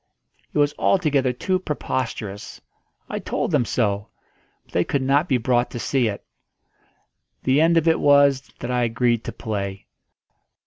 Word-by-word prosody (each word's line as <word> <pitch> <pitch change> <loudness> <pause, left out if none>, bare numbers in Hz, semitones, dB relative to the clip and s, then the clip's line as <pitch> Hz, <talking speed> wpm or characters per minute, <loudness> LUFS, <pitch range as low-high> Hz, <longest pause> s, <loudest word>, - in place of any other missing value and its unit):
It - - -4
was 145 0 +3
altogether 145 -8 +2
too 185 +9 -1
preposterous. 115 - -4 0.5
I - - -4
told - - -2
them 120 - +2
so. 105 -3 -1 0.6
But - - -26
they 90 - +2
could 140 +6 -1
not 140 +6 +2
be 130 - +3
brought 120 +1 +1
to 120 - -6
see 130 0 +1
it. 100 -2 -5 1.2
The 135 +3 +3
end 165 +1 +4
of 165 0 +2
it 165 - +4
was 140 -2 +4
that 120 - -3
I 125 0 +1
agreed 120 0 +1
to - - -4
play. 100 -3 -5
130 Hz, 160 wpm, -22 LUFS, 115-145 Hz, 1.2 s, end